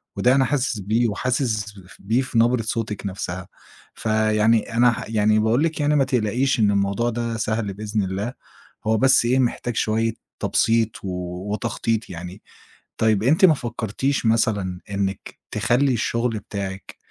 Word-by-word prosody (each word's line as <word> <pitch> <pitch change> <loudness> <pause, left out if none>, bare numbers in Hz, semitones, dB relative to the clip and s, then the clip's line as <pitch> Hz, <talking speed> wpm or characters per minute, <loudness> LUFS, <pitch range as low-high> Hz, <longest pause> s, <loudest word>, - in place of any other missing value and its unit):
وده 125 +2 +3
أنا 135 - +3
حاسس 130 -4 -1
بيه 110 +4 +1
وحاسس 105 -3 -2
بف 90 0 -16
بيه 110 +6 +1
في 130 -3 -3
نبرة 120 +1 +3
صوتِك 110 -2 -3
نفسها. 95 -2 -5 0.5
فيعني 110 +1 +1
أنا 120 +1 +5
ه - - -5
يعني 110 -1 +2
باقول 110 +6 +2
لِك 160 -1 -1
يعني 150 +1 +2
ما 140 - +4
تقلقيش 125 +1 0
إن 105 -2 +4
الموضوع 100 +4 +1
ده 115 -1 -3
سهل 110 -2 -2
بإذن 105 +1 -2
الله، 100 +6 -3 0.5
هو 110 - +3
بس 130 +1 +4
إيه، 125 +3 +2
محتاج 120 -1 -1
شوية 115 +1 +1 0.3
تبسيط 115 -1 +2
و - - -4 0.5
وتخطيط 115 0 -2
يعني. 90 +2 -8 0.6
طيب، 110 -2 +2
أنتِ 150 - +3
ما 165 -4 +8
فكّرتيش 120 +2 -2
مثلًا 100 -5 +1
إنك 100 -1 -3
تخلّي 125 +5 +2
الشغل 115 0 -1
بتاعِك 100 -2 -6
110 Hz, 155 wpm, -22 LUFS, 105-120 Hz, 0.6 s, ما